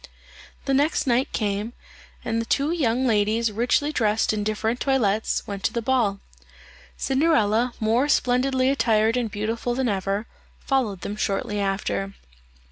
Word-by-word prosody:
The 275 - 0
next 290 +4 +2
night 255 0 +1
came, 210 +1 -2 0.5
and 230 -1 0
the - - -4
two 285 +3 +1
young 260 -6 +1
ladies 220 0 +1
richly 245 +7 +1
dressed 220 -5 +1
in 210 -1 -2
different 220 +3 -1
toilettes, 220 -6 0
went 200 -1 -6
to - - +1
the 235 - -1
ball. 225 -6 +1 0.8
Cinderella, 250 -5 +2
more 230 +6 +1
splendidly 260 0 +2
attired 225 -3 +2
and 245 -3 -1
beautiful 225 +4 -2
than 260 0 0
ever, 195 +1 -1 0.3
followed 235 -9 -1
them 205 - -4
shortly 205 0 -1
after. 195 0 -2
230 Hz, 140 wpm, -24 LUFS, 210-260 Hz, 0.8 s, next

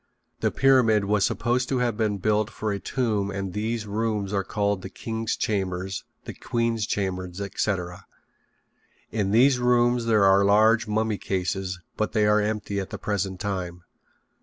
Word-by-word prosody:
The - - +1
pyramid 120 -6 +4
was 100 -1 +2
supposed 125 +1 -1
to 135 - 0
have 120 -3 0
been 105 -2 0
built 105 +2 +1
for 110 -2 -3
a 100 - -2
tomb 105 -4 -1
and 100 -2 -4
these 110 +2 -2
rooms 105 -1 -2
are 100 -1 +1
called 100 -1 -1
the 95 - -7
king's 110 +2 -3
chamber, 95 -3 -2 0.4
the - - -6
queen's 115 -2 -1
chamber, 95 -2 -2
etc. 95 -2 -3 1.0
In 105 -3 -1
these 125 +5 +4
rooms 120 -1 +2
there 110 -3 +3
are 95 +1 +5
large 110 +3 +4
mummy 110 0 0
cases, 95 0 -2 0.2
but 110 - -1
they 110 -2 +3
are 105 0 +4
empty 105 -1 -2
at 95 - -5
the - - -6
present 95 -3 -2
time. 90 -3 -4
105 Hz, 160 wpm, -25 LUFS, 95-115 Hz, 1.0 s, are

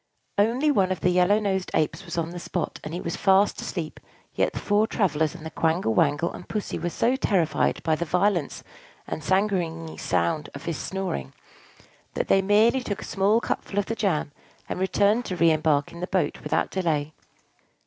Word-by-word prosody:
Only 245 +8 +3
one 190 -8 +2
of 185 - -2
the 180 - +3
yellow 180 +3 +4
nosed 190 -3 -1
Apes 160 +5 0
was 170 -1 -6
on 165 0 -1
the 175 - -6
spot, - - -3
and 150 - -6
he 175 - -4
was 170 - -3
fast 195 +1 +3
asleep; 165 -4 -5 0.3
yet - - +1
the - - -6
four 210 +1 +2
travellers 160 -7 0
and 165 -2 -10
the 160 - -6
Quangle 160 -8 +1
Wangle 145 +7 +2
and - - -10
Pussy 210 -2 -3
were 175 - -2
so 235 +8 +1
terrified 190 - +1
by 160 - +2
the 170 - -2
violence 180 -1 0 0.4
and 155 - -5
sanguinary 175 -3 0
sound 90 - 0
of 140 - -8
his 165 -6 -3
snoring, 185 - -4 0.8
that - - -2
they 195 - +5
merely 215 +6 +4
took 205 -5 -4
a - - -7
small 205 +3 +2
cupful 205 - -4
of 205 - +2
the 225 - -3
jam, 175 -10 0 0.4
and - - -4
returned 200 +4 +2
to 185 - -3
re 165 -1 +4
embark 155 -2 +1
in 170 - -10
their 180 - -3
boat 190 -2 -1
without - - -1
delay. 155 -5 -1
180 Hz, 195 wpm, -25 LUFS, 160-200 Hz, 0.8 s, they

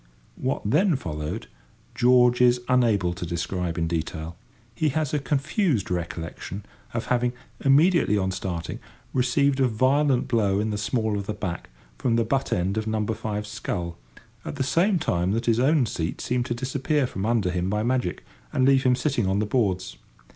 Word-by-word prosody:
What 130 +2 -2
then 175 - +3
followed 80 - -4 0.5
George 125 0 +4
is 125 0 +5
unable 110 -8 +2
to 90 - -7
describe 85 0 -3
in 85 - +1
detail. 80 0 -3 0.4
He 155 +7 +1
has 155 0 -1
a 150 - +2
confused 140 - 0
recollection 85 +3 -5 0.3
of 115 - -2
having, 125 0 +1 0.3
immediately 145 - +4
on 95 -1 0
starting, 90 -3 -4 0.3
received 135 +2 +2
a 130 - +4
violent 130 +3 +2
blow 105 -5 +2
in 110 +1 -1
the 105 - -2
small 110 -1 0
of 100 - -6
the 105 - -3
back 95 -4 -5 0.3
from 120 -3 +1
the 115 - +3
butt 135 +4 -1
end 95 +4 0
of 110 - -5
number 110 0 0
five's 105 -1 -4
scull, 85 -5 -4 0.5
at - - -5
the 135 - -1
same 180 +8 +2
time 90 - 0
that 115 +2 -1
his 115 -1 +2
own 140 +1 +4
seat 80 -6 -3
seemed 125 0 -1
to 120 - -2
disappear 135 +3 0
from 95 -6 -5
under 110 -4 +1
him 90 +1 -1
by 105 +1 0
magic, 125 -7 -1 0.3
and 130 - +2
leave 135 0 +5
him 125 -1 +3
sitting 125 -5 0
on 95 +1 +1
the 105 - +1
boards. 95 - -1
115 Hz, 180 wpm, -25 LUFS, 95-130 Hz, 0.5 s, is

